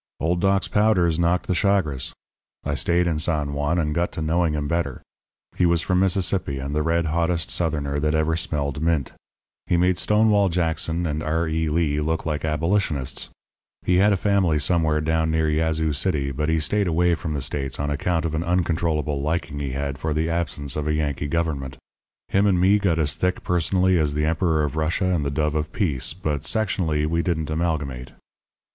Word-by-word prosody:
"Old 85 Hz, +2 st, 0 dB
Doc's 100 Hz, 0 st, +2 dB
powders 90 Hz, -6 st, +2 dB
knocked 85 Hz, +1 st, +1 dB
the -, -, 0 dB
chagres. 90 Hz, -8 st, 0 dB, 0.5 s
I 70 Hz, -, -2 dB
stayed 85 Hz, +4 st, +1 dB
in 80 Hz, -3 st, 0 dB
San 75 Hz, -3 st, 0 dB
Juan, 75 Hz, +4 st, 0 dB
and 75 Hz, -3 st, 0 dB
got 85 Hz, +2 st, 0 dB
to -, -, -4 dB
knowing 80 Hz, 0 st, +1 dB
him 75 Hz, -1 st, -2 dB
better. 85 Hz, -5 st, -2 dB, 0.5 s
He 90 Hz, -, +3 dB
was 85 Hz, -1 st, +2 dB
from 90 Hz, 0 st, +1 dB
Mississippi, 95 Hz, -5 st, 0 dB
and 70 Hz, +2 st, -4 dB
the 75 Hz, -, +1 dB
red 85 Hz, +2 st, +1 dB
hottest 85 Hz, +1 st, 0 dB
Southerner 75 Hz, -4 st, -1 dB
that 75 Hz, +1 st, 0 dB
ever 80 Hz, +1 st, +1 dB
smelled 75 Hz, -4 st, -2 dB
mint. 80 Hz, -5 st, 0 dB, 0.6 s
He 85 Hz, -, +2 dB
made 90 Hz, +1 st, +2 dB
Stonewall 105 Hz, -2 st, +3 dB
Jackson 85 Hz, 0 st, -1 dB
and 75 Hz, -1 st, -2 dB
R. 80 Hz, +2 st, 0 dB
E. 80 Hz, 0 st, -1 dB
Lee 75 Hz, -2 st, +1 dB
look 80 Hz, +2 st, -1 dB
like 75 Hz, -2 st, -2 dB
Abolitionists. 80 Hz, -2 st, -1 dB, 0.5 s
He 90 Hz, -, +2 dB
had 100 Hz, +3 st, +5 dB
a 100 Hz, -, +2 dB
family 95 Hz, -5 st, +2 dB
somewhere 80 Hz, 0 st, +1 dB
down 80 Hz, +1 st, +1 dB
near 80 Hz, 0 st, +1 dB
Yazoo 80 Hz, 0 st, 0 dB
City; 70 Hz, -3 st, 0 dB
but 75 Hz, +4 st, -2 dB
he 80 Hz, 0 st, +2 dB
stayed 100 Hz, +6 st, +1 dB
away 85 Hz, +1 st, +2 dB
from 80 Hz, -2 st, -3 dB
the 70 Hz, -, -2 dB
States 70 Hz, -1 st, -3 dB
on 75 Hz, 0 st, -1 dB
account 80 Hz, +3 st, -1 dB
of 80 Hz, -, -2 dB
an 80 Hz, +1 st, -1 dB
uncontrollable 80 Hz, -4 st, 0 dB
liking 75 Hz, -1 st, -2 dB
he 70 Hz, -3 st, -3 dB
had 70 Hz, 0 st, -3 dB
for 75 Hz, 0 st, -2 dB
the 80 Hz, +2 st, 0 dB
absence 75 Hz, -5 st, -2 dB
of 75 Hz, 0 st, -2 dB
a 75 Hz, -, +1 dB
Yankee 75 Hz, -2 st, -1 dB
government. 70 Hz, -5 st, -2 dB, 0.5 s
Him 100 Hz, +1 st, +3 dB
and 95 Hz, -3 st, +3 dB
me 95 Hz, +3 st, +4 dB
got 90 Hz, -5 st, +1 dB
as 75 Hz, -3 st, +1 dB
thick 90 Hz, 0 st, -1 dB
personally 90 Hz, +1 st, +2 dB
as 75 Hz, -2 st, 0 dB
the 75 Hz, 0 st, +1 dB
Emperor 80 Hz, -1 st, +1 dB
of 75 Hz, -1 st, -2 dB
Russia 85 Hz, +4 st, 0 dB
and 80 Hz, -4 st, 0 dB
the 70 Hz, -, -1 dB
dove 75 Hz, +1 st, 0 dB
of 75 Hz, 0 st, -2 dB
peace, 75 Hz, -, -1 dB
but 75 Hz, -6 st, -3 dB
sectionally 85 Hz, -7 st, 0 dB
we 85 Hz, +2 st, 0 dB
didn't 80 Hz, -4 st, -2 dB
amalgamate. 75 Hz, -6 st, -2 dB
80 Hz, 195 wpm, -23 LUFS, 75-85 Hz, 0.6 s, had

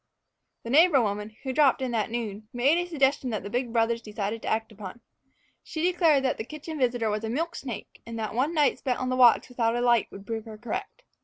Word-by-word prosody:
The 230 Hz, -, -5 dB
neighbor 315 Hz, 0 st, +6 dB
woman, 210 Hz, -1 st, -2 dB
who 265 Hz, -1 st, -3 dB
dropped 280 Hz, -1 st, +4 dB
in 260 Hz, -2 st, -2 dB
that 225 Hz, -2 st, 0 dB
noon, 220 Hz, -3 st, -5 dB
made 275 Hz, +7 st, +3 dB
a 350 Hz, 0 st, -3 dB
suggestion 275 Hz, -4 st, +1 dB
that 215 Hz, -4 st, -3 dB
the 200 Hz, -, -7 dB
big 245 Hz, -1 st, -1 dB
brothers 230 Hz, 0 st, +1 dB
decided 210 Hz, 0 st, -4 dB
to -, -, -7 dB
act 220 Hz, 0 st, -1 dB
upon. 210 Hz, +1 st, -9 dB, 0.6 s
She 315 Hz, -, -5 dB
declared 335 Hz, -6 st, +3 dB
that 260 Hz, -, 0 dB
the -, -, -2 dB
kitchen 305 Hz, +4 st, -7 dB
visitor 240 Hz, -4 st, +1 dB
was 210 Hz, +1 st, -2 dB
a 220 Hz, -, -3 dB
milk 330 Hz, +8 st, -2 dB
snake, 245 Hz, -6 st, -8 dB
and 230 Hz, 0 st, -7 dB
that 220 Hz, -1 st, -3 dB
one 260 Hz, +7 st, +1 dB
night 295 Hz, -3 st, +3 dB
spent 250 Hz, -2 st, -1 dB
on 255 Hz, -, -2 dB
the 255 Hz, -, 0 dB
watch 250 Hz, -2 st, +5 dB
without 235 Hz, -2 st, 0 dB
a 240 Hz, -, 0 dB
light 240 Hz, -3 st, +3 dB
would 195 Hz, 0 st, -11 dB
prove 225 Hz, 0 st, -4 dB
her 220 Hz, -1 st, -9 dB
correct. 245 Hz, -, -6 dB
240 Hz, 235 wpm, -27 LUFS, 220-275 Hz, 0.6 s, neighbor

